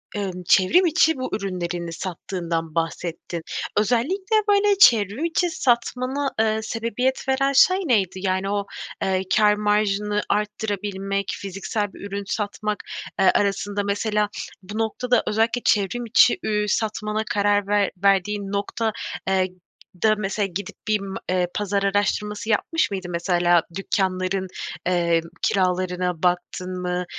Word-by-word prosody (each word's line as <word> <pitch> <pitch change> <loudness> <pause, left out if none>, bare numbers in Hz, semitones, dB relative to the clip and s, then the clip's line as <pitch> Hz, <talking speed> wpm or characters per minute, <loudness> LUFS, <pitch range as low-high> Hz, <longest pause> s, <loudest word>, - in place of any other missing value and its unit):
emm, 190 -3 -4
çevrim 210 - +5
içi 320 -1 +4
bu 255 - -3
ürünlerini 175 -4 -4
sattığından 170 -2 -4
bahsettin. 165 +1 -3 0.4
Özellikle, 275 - +1
böyle, 405 0 +4
çevrim 225 - +5
içi 345 +1 +1
satmana, 255 0 0
eee, 220 0 +2
sebebiyet 230 +4 -2
veren 275 +1 +2
şey 370 +7 +6
neydi? 235 - +1
Yani, 190 0 -1
o, 200 0 -1 0.4
eee, 190 -1 +1
kâr 210 -2 +5
marjını 210 0 +1
arttırabilmek, 205 -2 -2
fiziksel 200 +1 -4
bir - - -13
ürün 200 0 -4
satmak, 210 0 -3 0.4
eee, 190 - +6
arasında 205 0 0
mesela 210 +1 0 0.3
bu 205 +3 -7
noktada 245 +2 +1
özellikle 225 +3 +1
çevrim 210 +4 +1
içi, 235 +2 +5
ü 210 -1 0
satmana 215 0 -1
karar 205 -1 +2
ver 205 -1 +2
verdiğin 200 +1 +2
nokta, 205 +3 -1 0.4
eee, 190 -1 +2 0.6
da 215 -1 +5
mesela, 205 0 -1
gidip 195 +1 -6
bir 215 0 +2
m 195 -1 -6
eee, 180 -1 +1
pazar 200 -1 -1
araştırması 205 +2 0
yapmış 275 +6 +1
mıydın? 185 -3 -4
Mesela, 175 0 +3
dükkânların, 190 -1 -1 0.4
eee, 170 -2 +2 0.2
kiralarına 180 -2 0
baktın 180 +1 -1
mı? 180 0 -2
205 Hz, 130 wpm, -23 LUFS, 185-220 Hz, 0.6 s, şey